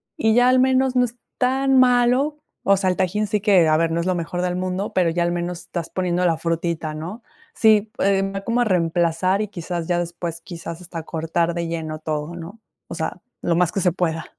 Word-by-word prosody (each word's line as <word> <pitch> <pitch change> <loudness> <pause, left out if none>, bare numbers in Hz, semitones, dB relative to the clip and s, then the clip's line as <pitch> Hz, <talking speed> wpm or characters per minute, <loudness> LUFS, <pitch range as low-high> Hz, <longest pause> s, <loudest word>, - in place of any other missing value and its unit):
y 220 -1 +2
ya 245 +1 +5
al 255 0 +5
menos 260 0 +3
no 250 - +4
es 245 0 -4 0.2
tan 265 +1 +2
malo. 255 +4 +3 0.3
O 195 0 +4
sea, 190 -1 +1
el 180 - +1
tajín 200 +3 0
sí 210 -1 -1
que 190 -6 +5
a 155 - +4
ver, 165 0 +1
no 165 - 0
es 170 - -2
lo 185 -1 +1
mejor 175 +1 -3
del 180 0 -1
mundo, 185 +2 -3
pero 180 -3 +3
ya 170 +1 0
al 175 0 0
menos 175 0 -3
estás 170 -2 -5
poniendo 180 -1 0
la 165 -2 +2
frutita, 165 -1 -2
¿no? 175 +10 -7 0.3
Sí, 215 -1 +3
em, 195 0 +1
va 195 - -3
como 240 +1 +1
a - - +5
reemplazar 175 0 +1
y 210 - -3
quizás, 170 -2 -5
ya 175 -1 +1
después, 170 -1 -4
quizás 170 -1 -8
hasta 170 -2 -7
cortar 165 +1 -1
de 170 -1 -3
lleno 160 -2 -4
todo, 155 +1 -3
¿no? 175 +7 -9 0.3
O - - -7
sea, - - -4 0.2
lo 170 - +1
más 175 -1 +2
que 195 - -2
se 180 - +3
pueda. 165 -2 -2
180 Hz, 230 wpm, -22 LUFS, 165-210 Hz, 0.3 s, ya